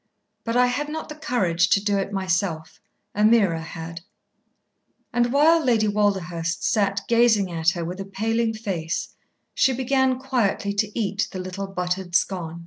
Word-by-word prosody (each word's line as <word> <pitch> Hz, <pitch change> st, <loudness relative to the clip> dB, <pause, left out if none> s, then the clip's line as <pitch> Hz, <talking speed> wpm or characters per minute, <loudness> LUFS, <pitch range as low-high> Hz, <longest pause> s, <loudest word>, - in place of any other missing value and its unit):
But 230 Hz, +1 st, -1 dB
I 250 Hz, -, +5 dB
had 270 Hz, +4 st, -2 dB
not 315 Hz, +1 st, -5 dB
the 300 Hz, -, -7 dB
courage 185 Hz, -, +1 dB
to -, -, +4 dB
do 200 Hz, 0 st, 0 dB
it 195 Hz, +1 st, -3 dB
myself. 180 Hz, -4 st, -2 dB, 0.3 s
Ameerah 210 Hz, -6 st, +3 dB
had." 165 Hz, +1 st, -8 dB, 1.1 s
And 240 Hz, 0 st, +2 dB
while 315 Hz, +4 st, +4 dB
Lady 230 Hz, -5 st, +2 dB
Walderhurst 180 Hz, -5 st, -1 dB
sat 200 Hz, -4 st, +1 dB
gazing 230 Hz, -5 st, +3 dB
at 165 Hz, -1 st, +2 dB
her 170 Hz, -1 st, -3 dB
with 180 Hz, +3 st, -6 dB
a 195 Hz, -, -4 dB
paling 225 Hz, +3 st, -1 dB
face, 180 Hz, -7 st, -3 dB, 0.4 s
she 265 Hz, -, +3 dB
began 260 Hz, 0 st, +1 dB
quietly 240 Hz, -6 st, -1 dB
to 210 Hz, +2 st, -1 dB
eat 200 Hz, -1 st, -1 dB
the -, -, -6 dB
little 185 Hz, +2 st, -5 dB
buttered 180 Hz, -1 st, -3 dB
scone. 170 Hz, -3 st, 0 dB
200 Hz, 155 wpm, -23 LUFS, 180-235 Hz, 1.1 s, I